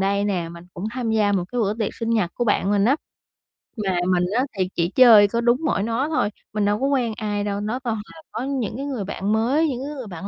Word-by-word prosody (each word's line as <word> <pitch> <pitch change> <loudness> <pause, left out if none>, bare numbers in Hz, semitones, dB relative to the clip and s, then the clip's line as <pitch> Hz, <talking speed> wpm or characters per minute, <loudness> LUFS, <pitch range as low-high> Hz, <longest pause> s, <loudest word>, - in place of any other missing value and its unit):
đây 200 +1 +1
nè, 180 -5 -1
mình 170 +1 -11
cũng 180 - -6
tham 240 -2 -2
gia 210 -2 +2
một 185 -3 +1
cái 245 - 0
bữa 205 0 +1
tiệc 215 -3 -3
sinh 230 0 -3
nhật 205 -7 +1
của 240 - -1
bạn 205 -3 +1
mình 200 -1 +3
á, 270 +6 +4 0.9
mà 190 -2 0
mình 180 -1 +2
á 255 - +3
thì 185 -1 0
chỉ 170 0 +1
chơi 225 -5 +8
có 235 +3 -1
đúng 240 +1 +3
mỗi 200 - +1
nó 230 +6 -1
thôi, 305 -10 +1 0.2
mình 210 -1 0
đâu 205 +1 +1
có 270 - +2
quen 250 -5 +1
ai 205 -2 -2
đâu, 200 -1 -2
nó 220 +5 -2
toàn 240 -4 -2 0.2
là 325 - -13
có 225 - -4
những 260 -6 -2
cái 275 - -4
người 260 -7 -3
bạn 200 +1 -2
mới, 260 +9 +2
những 260 -5 -3
cái 295 - -5
người 255 -5 -7
bạn 185 0 -7
215 Hz, 270 wpm, -23 LUFS, 200-245 Hz, 0.9 s, chơi